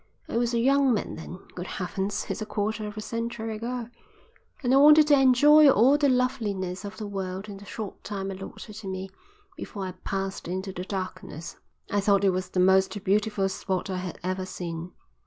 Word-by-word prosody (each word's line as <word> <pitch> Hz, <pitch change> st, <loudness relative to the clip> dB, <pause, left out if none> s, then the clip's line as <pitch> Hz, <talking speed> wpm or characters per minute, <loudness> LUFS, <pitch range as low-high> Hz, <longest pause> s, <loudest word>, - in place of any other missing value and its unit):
I -, -, -5 dB
was 235 Hz, 0 st, +1 dB
a -, -, +2 dB
young 270 Hz, 0 st, +4 dB
man -, -, -3 dB
then 165 Hz, +2 st, -8 dB, 0.2 s
Good 180 Hz, +1 st, -6 dB
Heavens, 195 Hz, +3 st, -2 dB
it's -, -, -4 dB
a -, -, -2 dB
quarter 215 Hz, 0 st, -2 dB
of 210 Hz, 0 st, -8 dB
a -, -, -3 dB
century 230 Hz, 0 st, -4 dB
ago 235 Hz, +1 st, -4 dB, 0.8 s
and 250 Hz, 0 st, +2 dB
I -, -, +7 dB
wanted 300 Hz, +2 st, +8 dB
to 295 Hz, -, +4 dB
enjoy 290 Hz, +3 st, +7 dB
all 260 Hz, +3 st, +5 dB
the 290 Hz, -1 st, +3 dB
loveliness 215 Hz, -8 st, -1 dB
of 200 Hz, 0 st, -7 dB
the 215 Hz, -, -5 dB
world 195 Hz, 0 st, -4 dB
in 200 Hz, -2 st, -8 dB
the 200 Hz, -, -12 dB
short 210 Hz, -1 st, -7 dB
time 195 Hz, -1 st, -4 dB
allotted 195 Hz, +3 st, -8 dB
to 215 Hz, -3 st, -8 dB
me 190 Hz, 0 st, -5 dB, 0.4 s
before 200 Hz, -2 st, -6 dB
I 185 Hz, -, -4 dB
passed 195 Hz, 0 st, -4 dB
into 190 Hz, +2 st, -4 dB
the 180 Hz, 0 st, -5 dB
darkness. 185 Hz, -4 st, -6 dB, 0.3 s
I 205 Hz, -, +2 dB
thought 200 Hz, 0 st, +3 dB
it 195 Hz, -, +5 dB
was 185 Hz, 0 st, -3 dB
the 185 Hz, -, -1 dB
most 190 Hz, +2 st, +3 dB
beautiful 205 Hz, 0 st, +1 dB
spot 190 Hz, -1 st, -3 dB
I 185 Hz, -, -2 dB
had 180 Hz, -1 st, -5 dB
ever 185 Hz, +1 st, -2 dB
seen. 175 Hz, -1 st, -5 dB
200 Hz, 200 wpm, -27 LUFS, 190-230 Hz, 0.8 s, wanted